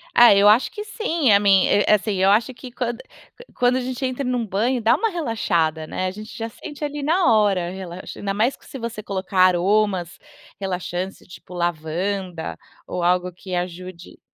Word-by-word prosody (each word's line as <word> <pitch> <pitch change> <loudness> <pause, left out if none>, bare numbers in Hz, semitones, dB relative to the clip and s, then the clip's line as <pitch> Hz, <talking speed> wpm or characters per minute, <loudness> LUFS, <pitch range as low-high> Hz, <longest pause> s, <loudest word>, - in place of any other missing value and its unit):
Ah, 240 -3 +8
eu 200 +1 +5
acho 220 +5 +4
que 420 -3 -6
sim, 340 - 0
a 200 - +6
mi 195 -2 +4
é 205 - +3
é - - +6
assim, 210 +1 -2
eu 190 +1 +3
acho 225 +5 +2
que 255 0 -11
quando 240 -1 -3
que - - -17
quando 245 0 +2
a - - -1
gente 255 +2 -5
entra 255 +2 -2
num 250 -2 -1
banho, 230 +6 0
dá 225 +1 +4
uma 450 - 0
relaxada, 180 - -1
né? 185 +4 -3
A - - -2
gente 215 +3 -10
já 225 0 -4
sente 290 +5 -9
ali 295 0 -3
na 325 -2 +3
hora, 195 -5 +2
relaxa, 185 -1 -8
ainda 195 -1 -2
mais 225 +6 +1
que - - -24
se 270 - -9
você 230 -2 -5
colocar 190 -1 -3
aromas 185 0 +2 0.4
relaxantes, 185 -1 -4
tipo 180 0 -13
lavanda 175 +1 -3 0.3
ou 180 - -3
algo 180 +1 +1
que 180 +1 -10
ajude. 180 0 -6
205 Hz, 195 wpm, -22 LUFS, 180-245 Hz, 0.4 s, Ah